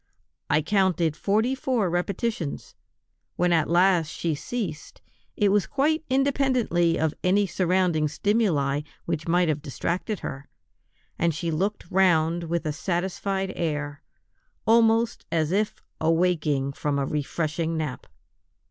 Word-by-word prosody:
I 150 +1 +3
counted 180 -3 +1
forty 215 +9 +1
four 255 -6 0
repetitions; 175 -1 -2 0.6
when 180 -1 +2
at 160 -3 +2
last 175 -1 +4
she 165 +1 -2
ceased, 160 +1 -5 0.4
it 205 -2 +3
was 200 -1 +2
quite 305 +3 +1
independently 255 -11 +2
of 160 -1 0
any 200 +3 +3
surrounding 180 -4 +1
stimuli 150 -6 +1 0.2
which 165 -1 -3
might 175 +1 +3
have 150 -2 0
distracted 170 - -3
her, 135 +1 -6 0.7
and 165 -2 +1
she 165 +1 -2
looked 195 +7 -1
round 170 -2 +3
with 170 0 -2
a 155 - -1
satisfied 190 +3 -2
air, 150 -3 -3 0.6
almost 225 0 +3
as 160 -1 +1
if 205 +2 -1 0.2
awaking 160 -4 +1
from 145 0 -1
a 140 - 0
refreshing 155 +3 -2
nap. 150 -5 -4
175 Hz, 125 wpm, -25 LUFS, 155-200 Hz, 0.7 s, last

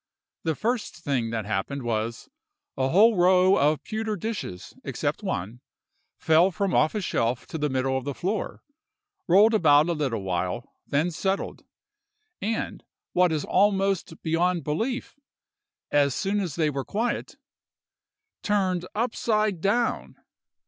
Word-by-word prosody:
The 160 -1 -1
first 235 - -2
thing 125 -5 -1
that 110 -2 -3
happened 110 +7 -2
was, 115 0 -2 0.5
a 130 0 0
whole 215 +8 +5
row 185 +1 +5
of 150 +2 +2
pewter 220 0 -3
dishes, 205 - -5
except - - -2
one, 110 +8 -4 0.6
fell 160 +3 +4
from 195 0 -2
off 155 - +3
a 210 - -1
shelf 120 -8 -1
to 160 - -4
the 150 0 0
middle 130 0 0
of 130 - -1
the 140 0 -4
floor, 200 +4 -3 0.6
rolled 205 +6 +6
about 155 -5 +5
a - - +2
little 135 -10 -2
while, 95 +5 -2 0.2
then 155 +5 +1
settled; 190 +4 -2 0.8
and, 220 +2 -3 0.3
what 180 -1 +4
is 155 -2 -1
almost 195 -4 +1
beyond 170 +2 +1
belief, 235 - -3 0.7
as 140 -2 +3
soon 200 +2 0
as 175 -8 -3
they 155 -3 +1
were 135 -1 -3
quiet, 230 - -3 1.0
turned 185 -4 0
upside 215 -4 0
down! 230 +5 0
170 Hz, 135 wpm, -26 LUFS, 135-205 Hz, 1.0 s, rolled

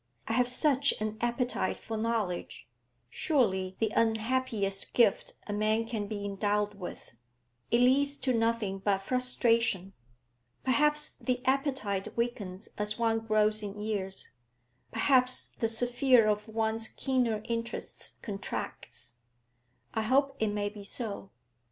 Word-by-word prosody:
I 225 - -1
have 250 +1 +3
such 280 +2 +2
an 215 0 -2
appetite 240 +1 0
for 225 - -5
knowledge, 220 -5 -2 0.4
surely 190 - 0
the 220 -2 0
unhappiest 225 -3 +1
gift 230 -5 +3
a 205 - -4
man 215 +2 +1
can 220 -3 -3
be 205 -1 -4
endowed 205 +1 0
with; 185 - -9 0.6
it 235 - +3
leads 280 +3 +3
to 260 - 0
nothing 225 -4 0
but 195 0 0
frustration. 230 -5 +2 0.7
Perhaps 300 +3 +2
the 250 -1 -1
appetite 260 -9 0
weakens 215 -5 -3
as 210 +1 -1
one 225 -1 +2
grows 215 -1 +2
in 205 0 -6
years; 200 -3 -3 0.6
perhaps 255 +2 +3
the 225 - -1
sphere 245 +1 +3
of 210 0 0
one's 220 0 0
keener 245 -5 0
interests 230 0 -4
contracts; 195 - -6 0.8
I 220 - 0
hope 275 +5 +2
it 220 - +2
may 205 0 -1
be 205 -1 -10
so. 200 -2 -5
225 Hz, 125 wpm, -30 LUFS, 205-250 Hz, 0.8 s, have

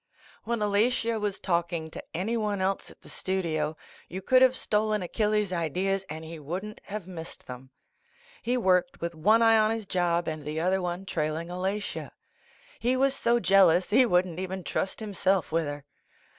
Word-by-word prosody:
VV/ - - -12
HEN 235 - 0
Alatia 225 +2 +1
was 205 -2 -2
talking 170 -3 -1
to - - -8
anyone 210 +2 -1
else 190 +1 -1
at - - -17
the - - -15
studio, 160 -5 -2 0.3
you 185 - -5
could 255 +7 +4
have 260 0 +6
stolen 215 -3 0
Achilles' 210 +1 0
ideas 185 +4 -1
and 160 +1 -6
he 165 0 -8
wouldn't 185 +8 -6
have 210 -3 -5
missed 170 -3 -8
them. 125 +1 -9 0.7
He 245 +2 0
worked 190 +3 +2
with 170 0 -3
one 215 +8 +4
eye 225 -1 +6
on 215 0 +4
his 225 -1 -2
job 175 -2 0
and 155 -1 -4
the 150 +2 -3
other 185 +3 +1
one 180 +1 -3
trailing 160 -1 -2
Alatia. 190 +3 -3 0.7
He 250 +2 +1
was 270 +1 +2
so 240 -2 +2
jealous 185 -4 +4
he 250 +3 +6
wouldn't 180 -3 +1
even 190 0 -4
trust 190 - -2
himself 195 -4 0
with 165 0 +1
her. 145 -1 -6
190 Hz, 175 wpm, -28 LUFS, 170-215 Hz, 0.7 s, have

